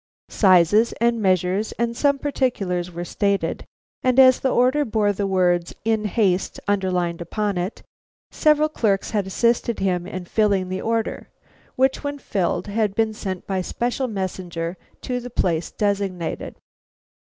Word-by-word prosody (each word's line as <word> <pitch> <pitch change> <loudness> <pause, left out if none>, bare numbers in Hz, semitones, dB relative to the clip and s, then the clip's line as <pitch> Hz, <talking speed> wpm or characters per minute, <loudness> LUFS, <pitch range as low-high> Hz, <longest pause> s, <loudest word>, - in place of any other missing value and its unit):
Sizes 190 +3 +4
and 235 -1 +1
measures 185 +2 +1
and 235 0 -2
some 280 +2 +2
particulars 210 -11 -1
were 175 0 -5
stated, 200 +1 -1 0.3
and 255 0 +2
as 255 -1 +7
the 265 - 0
order 255 +4 +3
bore 215 -4 +1
the 200 0 -2
words 175 -2 +1
In 220 -1 +1
haste 195 -3 0
underlined 180 -4 0
upon 205 +4 -2
it, 180 +4 -4 0.5
several 305 0 +3
clerks 215 -10 0
had 205 -3 -1
assisted 235 +3 +1
him 180 -2 -1
in 185 -1 -6
filling 200 -2 +1
this 185 0 -3
order, 225 0 -2 0.5
which 265 +2 +1
when 285 0 -3
filled 185 -8 -1
had 210 -1 -1
been 220 -1 +1
sent 190 -4 -5
by 190 -1 -1
special 245 +7 -2
messenger 185 -4 -4 0.3
to 250 -1 -2
the 245 0 -8
place 170 -7 0
designated. 195 -5 -2
205 Hz, 145 wpm, -22 LUFS, 185-235 Hz, 0.5 s, as